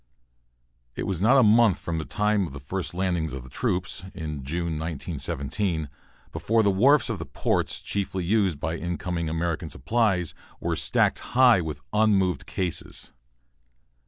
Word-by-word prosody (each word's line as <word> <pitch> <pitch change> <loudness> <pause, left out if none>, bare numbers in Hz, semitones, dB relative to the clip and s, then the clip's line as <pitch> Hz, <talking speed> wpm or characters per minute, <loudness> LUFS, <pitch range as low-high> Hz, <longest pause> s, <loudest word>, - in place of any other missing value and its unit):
It - - -3
was 95 -3 -2
not 125 +7 +5
a 130 - +7
month 110 -2 +5
from 85 -1 -3
the 80 - -4
time 105 -2 +1
of 65 - -10
the 70 - -7
first 90 +6 -4
landing 90 -4 0
of 65 -1 -8
troops, 95 - -2
in 75 -6 -5
June, 80 +2 -2
1917, 80 +1 -3 0.4
before 110 +8 +1
the 100 - +4
wharfs 135 +10 +4
of 115 -6 -3
the 80 - -5
ports - - -1
chiefly 95 -2 -2
used 95 -4 +1
by 80 +3 -2
incoming 85 -1 -3
American 80 0 -2
supplies 90 - 0 0.3
were - - -1
stacked - - +2 0.2
high 125 -7 +7
with 75 -3 -5
unmoved 100 -6 +2
cases. 90 -3 -4
90 Hz, 150 wpm, -26 LUFS, 80-105 Hz, 0.4 s, a